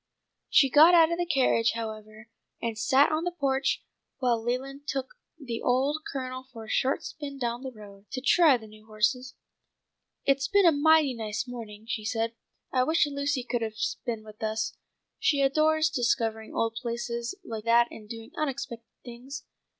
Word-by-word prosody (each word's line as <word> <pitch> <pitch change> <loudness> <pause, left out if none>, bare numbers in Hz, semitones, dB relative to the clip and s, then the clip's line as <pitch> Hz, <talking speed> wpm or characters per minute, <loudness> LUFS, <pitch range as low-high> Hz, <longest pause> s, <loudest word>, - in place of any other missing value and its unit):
She 275 - +6
got 320 +6 +8
out 330 -1 +6
of 340 - -1
the 350 - 0
carriage, 255 -6 +3
however, 215 -1 -7 0.3
and 230 -1 -3
sat 265 +7 +4
on 310 +1 0
the 355 - -1
porch 270 -1 +1 0.3
while 240 -3 +1
Leland 270 +4 -4
took 265 -3 -2 0.3
the 240 -6 -5
old 270 +5 +1
Colonel 255 -1 -5
for 225 -2 -9
a - - -12
short 265 +2 +1
spin 280 -2 -7
down 240 -1 -2
the 265 - -5
road, 205 -3 -14
to 265 - -2
try 280 +2 +5
the 225 - -12
new 215 0 -16
horses. 250 +4 0 0.9
"It's 275 0 +2
been 405 -1 +4
a 335 - +8
mighty 310 -1 +4
nice 220 0 -4
morning," 220 -3 -8
she 220 -2 -3
said. 225 +1 -1 0.4
"I 255 -1 +3
wish 315 +3 +3
Lucy 280 -2 -1
could 240 -1 -2
have 220 -1 -3 0.3
been 230 -4 -3
with 215 0 -14
us. 220 0 -2 0.4
She 285 -3 +2
adores 310 +3 +3
discovering 230 -4 0
old 225 0 -1
places 235 +2 -3
like 220 -5 -6
that 235 +1 +5
and 210 -1 -11
doing 225 +2 -8
unexpected 260 -6 -4 0.2
things. 255 +4 -8
250 Hz, 175 wpm, -28 LUFS, 225-280 Hz, 0.9 s, got